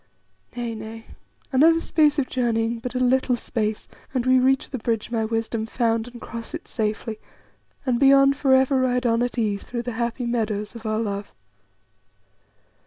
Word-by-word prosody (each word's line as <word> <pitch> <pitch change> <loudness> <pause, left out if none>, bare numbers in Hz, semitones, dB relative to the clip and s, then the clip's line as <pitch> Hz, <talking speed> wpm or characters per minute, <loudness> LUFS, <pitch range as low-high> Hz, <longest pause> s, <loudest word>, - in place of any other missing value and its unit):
Nay, 240 -1 -3
nay, 220 +1 -8 0.5
another 320 +5 +5
space 305 -2 +2
of 275 -3 +1
journeying, 230 -2 0
but 250 +2 -6
a - - +1
little 255 0 +2
space, 220 -3 -3 0.3
and 250 -1 0
we 255 0 +5
reach 265 +1 +2
the 260 - -3
bridge 225 0 -2
my 225 -2 0
wisdom 225 0 -2
found, 230 -1 0
and 245 -1 -10
cross 230 +6 -7
it 335 - -8
safely, 220 0 -3 0.7
and 250 -3 +1
beyond 275 0 +6
for 270 -2 +3
ever 265 0 +3
ride 250 0 +1
on 230 0 +2
at 245 0 -2
ease 210 -3 0
through 240 -1 -5
the 245 - -3
happy 235 +1 -2
meadows 215 -3 -2
of 230 -1 -7
our 215 0 0
love." 200 -2 -3
235 Hz, 175 wpm, -24 LUFS, 225-260 Hz, 0.7 s, beyond